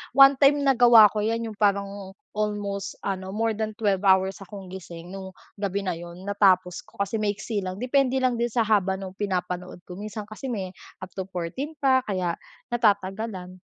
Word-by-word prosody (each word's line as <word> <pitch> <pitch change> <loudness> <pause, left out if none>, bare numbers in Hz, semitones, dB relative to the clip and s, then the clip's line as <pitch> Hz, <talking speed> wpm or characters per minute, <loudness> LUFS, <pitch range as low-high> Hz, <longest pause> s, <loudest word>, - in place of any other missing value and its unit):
one-time 275 +1 +6
nagawa 240 -4 +8
ko 215 - -1
'yan, 230 +2 -1
'yung 210 - -10
parang 200 -1 0 0.2
almost 205 -2 -2
ano, 190 -1 -3
more 225 +2 0
than 215 0 -2
12 200 -4 +1
hours 190 0 +3
akong 195 0 -10
gising 175 -1 -9
noong 190 -1 -8 0.2
gabi 200 0 -2
na 185 - 0
'yon. 175 +2 -10
Natapos 185 -3 +2
ko - - -22
kasi 200 +3 -1
maiksi 205 +1 -2
lang. 185 0 -4
Depende 265 +1 +2
lang 255 -2 +1
din 240 - +1
sa 235 0 +2
haba 200 -3 +2
nung 190 -1 -7
pinapanood 180 -3 -3
ko, 180 - -8
minsan 210 0 -6
kasi 215 +5 -8
may 190 -5 -4 0.3
up 185 - -8
to 190 - -2
14 190 - -4
pa 265 -2 +3
kaya 185 -4 -1 0.4
natatagalan. 195 -4 0
200 Hz, 175 wpm, -25 LUFS, 185-225 Hz, 0.4 s, nagawa